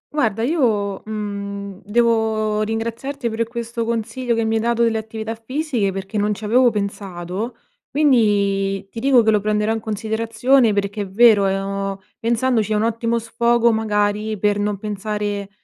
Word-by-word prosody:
Guarda 225 -7 +1
io, 220 - +1
mhmm, 200 -2 -5
devo 220 -1 +1
ringraziarti 230 +4 -3
per 225 0 -2
questo 235 0 -4
consiglio 235 +2 -2
che 225 0 0
mi 220 0 0
hai - - 0
dato 235 0 +1
delle 225 -1 +2
attività 220 0 -5
fisiche 240 -2 -2
perché 195 +2 -4
non 210 0 +1
ci 210 - -11
avevo 245 +4 +5
pensato, 200 0 -4 0.3
quindi 200 -8 +2
ti 230 - -6
dico 255 -1 +4
che 220 - +4
lo 210 - +3
prenderò 210 +1 +1
in 225 - -2
considerazione 225 +3 +1
perché 200 +1 -1
è 200 - -5
vero, 210 -1 +5
è 195 0 0
ho 195 0 -3 0.2
pensandoci 230 -1 +1
è - - +1
un 210 - +1
ottimo 230 +1 0
sfogo 235 +1 +2
magari 210 -1 0
per 205 +1 +1
non 205 0 -1
pensare, 205 0 -3
220 Hz, 160 wpm, -20 LUFS, 205-230 Hz, 0.3 s, avevo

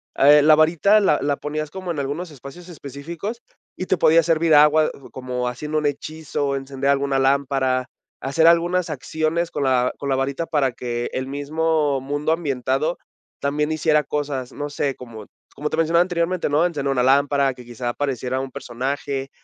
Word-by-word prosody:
ah, 140 - +5
el 150 0 +7
la 155 - +8
varita 170 +7 +4
la 170 -7 +2
la 145 0 0
ponías 150 0 -4
como 185 0 -7
en 150 - -4
algunos 150 +5 -4
espacios 145 +6 -12
específicos 170 - -7 0.4
y 185 - -3
te 185 - +1
podía 165 0 +5
servir 165 0 +2
agua, 150 +1 +5
uh, 135 - -14
como 125 -1 -4
haciendo 150 +5 -3
un 150 - -1
hechizo, 145 -1 -2
encender 135 0 -3
alguna 140 -1 +1
lámpara, 135 -1 +1 0.3
hacer 140 +5 +1
algunas 175 +1 +3
acciones 160 +3 -2
con - - -2
la 125 -2 +2
con 140 - -5
la 135 - +2
varita 135 +4 -2
para 140 -6 0
que 120 0 -4
el 130 0 -3
mismo 145 0 0
mundo 145 +3 -2
ambientado 140 0 -1 0.4
también 150 +2 -1
hiciera 155 -1 +2
cosas. 140 -3 -3
No 145 0 -5
sé, 140 -1 -2
como 115 -4 -10 0.3
como 150 +1 -3
te - - -2
mencionaba 165 +1 +3
anteriormente, 175 -1 -1
¿no?, 150 +3 +3
encender 140 -5 -2
una 130 -2 +1
lámpara, 140 +1 +3
que 125 - -12
quizá 120 0 -5
apareciera 130 -1 -2
un 135 0 -6
personaje. 135 +3 -4
145 Hz, 180 wpm, -22 LUFS, 135-160 Hz, 0.4 s, la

